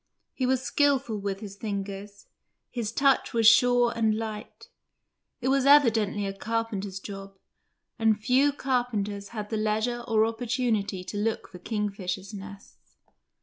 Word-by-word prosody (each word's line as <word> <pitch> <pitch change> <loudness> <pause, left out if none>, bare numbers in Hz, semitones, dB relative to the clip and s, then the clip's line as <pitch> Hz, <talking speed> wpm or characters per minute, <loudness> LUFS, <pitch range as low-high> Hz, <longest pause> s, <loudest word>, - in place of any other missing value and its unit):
He 255 - -1
was 260 0 +1
skilful 270 -7 +1
with 195 -1 -4
his 200 -2 -8
fingers, 200 -1 -6 0.5
his 230 -4 -3
touch 275 0 +2
was 230 -1 +2
sure 245 +1 +6
and 220 -2 +2
light. 220 -1 -7 0.7
It 255 - 0
was 270 0 +2
evidently 225 -8 +4
a 195 - -3
carpenter's 205 -2 -3
job, 195 0 -9 0.6
and 220 -1 +3
few 260 +6 +3
carpenters 235 -7 -2
had 210 -1 -7
the 220 - 0
leisure 220 +3 -1
or 220 -2 +3
opportunity 225 -4 -1
to 205 - -6
look 220 +2 -2
for 180 - -11
kingfishers' 200 -1 -3
nests. 200 0 -12
220 Hz, 140 wpm, -27 LUFS, 200-245 Hz, 0.7 s, sure